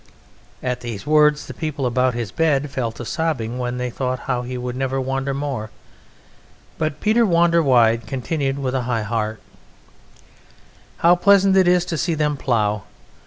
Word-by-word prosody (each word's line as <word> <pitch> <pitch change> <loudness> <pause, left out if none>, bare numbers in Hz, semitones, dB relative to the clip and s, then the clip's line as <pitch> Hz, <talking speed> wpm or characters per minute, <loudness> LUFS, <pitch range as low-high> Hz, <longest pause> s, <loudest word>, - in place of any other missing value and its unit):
At 125 -1 -2
these 115 -5 -6
words 150 -1 +3
the - - -8
people 150 -4 -3
about 125 0 +1
his 120 -3 -4
bed 150 -3 +1
fell 120 -4 -2
to 120 - -8
sobbing 130 -6 -2
when 125 0 -2
they 125 0 -3
thought 130 0 -3
how 125 -2 -2
he 125 +1 -5
would 125 0 -4
never 135 0 -1
wander 135 +1 -2
more, 135 -6 -3 1.1
but 155 -2 -2
Peter 220 +2 +3
Wanderwide 145 - +3
continued 135 +2 -2
with 130 -2 -2
a 130 - 0
high 115 -3 0
heart: 110 0 -2 1.6
"How 170 +1 +5
pleasant 195 +1 +4
it 190 -2 +5
is 180 -1 +3
to 165 -3 -3
see 170 -1 0
them 150 -1 0
plough! 110 -6 0
135 Hz, 165 wpm, -21 LUFS, 120-155 Hz, 1.6 s, How